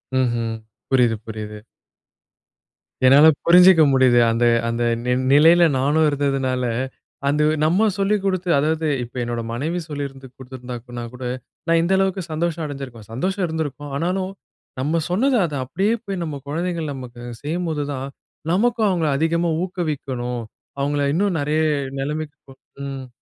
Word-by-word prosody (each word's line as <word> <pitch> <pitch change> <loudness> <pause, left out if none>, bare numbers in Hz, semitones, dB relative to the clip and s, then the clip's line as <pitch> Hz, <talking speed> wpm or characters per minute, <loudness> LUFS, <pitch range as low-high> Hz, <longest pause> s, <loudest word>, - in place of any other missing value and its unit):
ம்ஹ்ம். 120 -3 0 0.4
புரியிது, 125 -4 +4
புரியிது. 105 -1 -6 1.5
என்னால 140 +4 +8 0.2
புரிஞ்சுக்க 180 0 +7
முடியுது. 130 -2 +5
அந்த 115 +1 0 0.2
அந்த 115 +1 -1 0.2
நி 125 - +1 0.2
நிலையில 165 +4 +7 0.2
நானும் 150 +4 +3
இருந்ததுனால, 135 -3 0 0.6
அந்த 150 +2 +2 0.2
நம்ம 180 +8 +3
சொல்லி 200 +1 +2
குடுத்து 185 -2 -1
அதாவது 160 +2 0 0.2
இப்போ 120 +2 -10
என்னோட 120 0 -3
மனைவி 160 +8 -2
சொல்லியிருந்து, 140 -2 -6
குடுத்துருந்தானா 125 -2 -8
கூட 125 +1 -9 0.5
நான் 165 - +4
இந்த 185 +3 +1
அளவுக்கு 190 0 +1
சந்தோஷம் 165 +1 -1
அடைஞ்சுருக்கும். 135 -7 -8
சந்தோஷம் 185 - -1
இருந்துருக்கும், 145 -3 -4
ஆனாலும் 185 +4 -1 0.5
நம்ம 155 +5 +1
சொன்னது 255 +9 +2
அத 155 - -5
அப்டியே 195 - 0
போய் 195 -3 -4
நம்ம 155 -3 -4
குழந்தைகள் 165 0 -2
நமக்கு 125 -3 -9 0.2
செய்யும்போது 160 -1 -2
தான், 135 0 -4 0.5
நமக்கும் 225 +2 +2
அவுங்கள 170 -5 +1
அதிகமா 165 +2 +1
ஊக்குவிக்கணும், 135 -9 -3 0.4
அவங்கள 145 +1 0
இன்னும் 195 0 +1
நெறைய 150 +2 +1 0.4
நெலைமைக்கு 150 +1 -4
கு 135 - -13 0.3
ம். 135 -1 -6
150 Hz, 130 wpm, -21 LUFS, 130-175 Hz, 1.5 s, என்னால